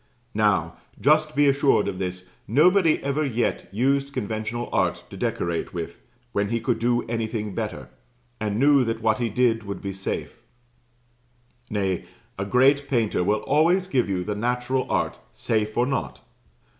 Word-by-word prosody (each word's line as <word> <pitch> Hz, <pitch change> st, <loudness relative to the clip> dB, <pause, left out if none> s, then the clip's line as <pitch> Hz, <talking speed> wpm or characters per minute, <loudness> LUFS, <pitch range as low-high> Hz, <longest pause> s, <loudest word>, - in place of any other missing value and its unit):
Now, 105 Hz, -2 st, +1 dB, 0.2 s
just 155 Hz, +1 st, +3 dB
be 145 Hz, 0 st, +4 dB
assured 140 Hz, -5 st, +3 dB
of 95 Hz, -2 st, -4 dB
this 90 Hz, 0 st, -4 dB, 0.2 s
nobody 165 Hz, -, +4 dB
ever 140 Hz, +2 st, 0 dB
yet 120 Hz, -4 st, -1 dB
used 140 Hz, +6 st, +1 dB
conventional 110 Hz, +2 st, -3 dB
art -, -, +1 dB
to -, -, -8 dB
decorate 85 Hz, +1 st, -2 dB
with, 85 Hz, 0 st, -5 dB, 0.3 s
when 100 Hz, -2 st, 0 dB
he 115 Hz, +1 st, 0 dB
could 120 Hz, +1 st, -1 dB
do 120 Hz, 0 st, +1 dB
anything 110 Hz, -2 st, -3 dB
better, 100 Hz, -, -4 dB, 0.5 s
and 105 Hz, -1 st, -1 dB
knew 140 Hz, +1 st, +5 dB
that 115 Hz, -1 st, -3 dB
what 110 Hz, +2 st, +2 dB
he 120 Hz, -1 st, 0 dB
did 115 Hz, 0 st, +2 dB
would 100 Hz, -2 st, -6 dB
be 100 Hz, -1 st, -5 dB
safe. 95 Hz, +1 st, -5 dB, 1.3 s
Nay, 95 Hz, -4 st, -1 dB, 0.3 s
a 100 Hz, -, -1 dB
great 135 Hz, +5 st, +4 dB
painter 115 Hz, -8 st, +1 dB
will 105 Hz, +3 st, +1 dB
always 170 Hz, +6 st, +3 dB
give 130 Hz, -, 0 dB
you 90 Hz, -2 st, -1 dB
the 105 Hz, -, -2 dB
natural 125 Hz, +4 st, -1 dB
art, -, -, -1 dB
safe 110 Hz, -1 st, -1 dB
or 120 Hz, -, +4 dB
not. 135 Hz, +1 st, -3 dB
115 Hz, 155 wpm, -24 LUFS, 105-135 Hz, 1.3 s, knew